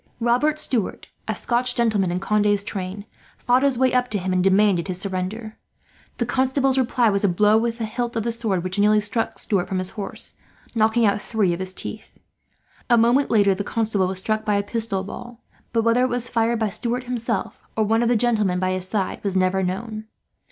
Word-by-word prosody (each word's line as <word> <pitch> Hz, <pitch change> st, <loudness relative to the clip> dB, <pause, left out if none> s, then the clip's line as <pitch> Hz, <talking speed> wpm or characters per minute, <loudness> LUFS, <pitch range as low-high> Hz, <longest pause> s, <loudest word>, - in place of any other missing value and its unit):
Robert 250 Hz, +6 st, +2 dB
Stuart, 240 Hz, -9 st, -1 dB, 0.2 s
a -, -, -1 dB
Scotch 245 Hz, +1 st, 0 dB
gentleman 215 Hz, -6 st, +1 dB
in 175 Hz, +1 st, -1 dB
Conde's 205 Hz, 0 st, +1 dB
train, 200 Hz, -1 st, -5 dB, 0.3 s
fought 250 Hz, +1 st, +2 dB
his 275 Hz, -3 st, +2 dB
way 260 Hz, 0 st, +2 dB
up 250 Hz, 0 st, +1 dB
to 210 Hz, -, -1 dB
him 185 Hz, -1 st, -2 dB
and 180 Hz, -1 st, +2 dB
demanded 195 Hz, -2 st, +3 dB
his 185 Hz, -1 st, -2 dB
surrender. 200 Hz, +3 st, -4 dB, 0.6 s
The 235 Hz, -, 0 dB
Constable's 265 Hz, +2 st, +1 dB
reply 245 Hz, -3 st, +2 dB
was 200 Hz, 0 st, +1 dB
a 200 Hz, -, +4 dB
blow 210 Hz, +4 st, +3 dB
with 230 Hz, 0 st, -2 dB
the 230 Hz, -, -3 dB
hilt 240 Hz, +2 st, -3 dB
of 225 Hz, -, -1 dB
the 235 Hz, -, -1 dB
sword 220 Hz, -6 st, -1 dB
which 185 Hz, +2 st, -3 dB
nearly 210 Hz, +1 st, +4 dB
struck 215 Hz, +2 st, -2 dB
Stuart 195 Hz, -4 st, -1 dB
from 190 Hz, -, -2 dB
his 185 Hz, 0 st, -1 dB
horse, 205 Hz, -, -8 dB, 0.4 s
knocking 225 Hz, +1 st, +3 dB
out 205 Hz, 0 st, +1 dB
three 205 Hz, -6 st, 0 dB
of 170 Hz, -, -5 dB
his 185 Hz, 0 st, -3 dB
teeth. -, -, -8 dB, 0.7 s
A 240 Hz, -, +5 dB
moment 240 Hz, +5 st, +3 dB
later 205 Hz, -3 st, +4 dB
the 195 Hz, +2 st, -3 dB
Constable 210 Hz, -3 st, 0 dB
was 190 Hz, 0 st, -4 dB
struck 215 Hz, +3 st, 0 dB
by 210 Hz, -1 st, +1 dB
a 200 Hz, -, +1 dB
pistol 220 Hz, -2 st, -2 dB
ball, 240 Hz, +4 st, -9 dB, 0.3 s
but 230 Hz, -1 st, +1 dB
whether 230 Hz, +2 st, +3 dB
it 255 Hz, -, +2 dB
was 245 Hz, 0 st, -1 dB
fired 230 Hz, 0 st, +1 dB
by 220 Hz, -1 st, 0 dB
Stuart 240 Hz, +5 st, -2 dB
himself, 235 Hz, -3 st, -3 dB, 0.2 s
or 220 Hz, -, +3 dB
one 225 Hz, +2 st, +2 dB
of 235 Hz, -, +2 dB
the 245 Hz, -, +3 dB
gentlemen 215 Hz, -5 st, +2 dB
by 185 Hz, 0 st, 0 dB
his 185 Hz, 0 st, -3 dB
side, 195 Hz, -1 st, -2 dB
was 200 Hz, -2 st, -1 dB
never 185 Hz, +1 st, +2 dB
known. 215 Hz, +4 st, -4 dB
215 Hz, 215 wpm, -22 LUFS, 195-235 Hz, 0.7 s, A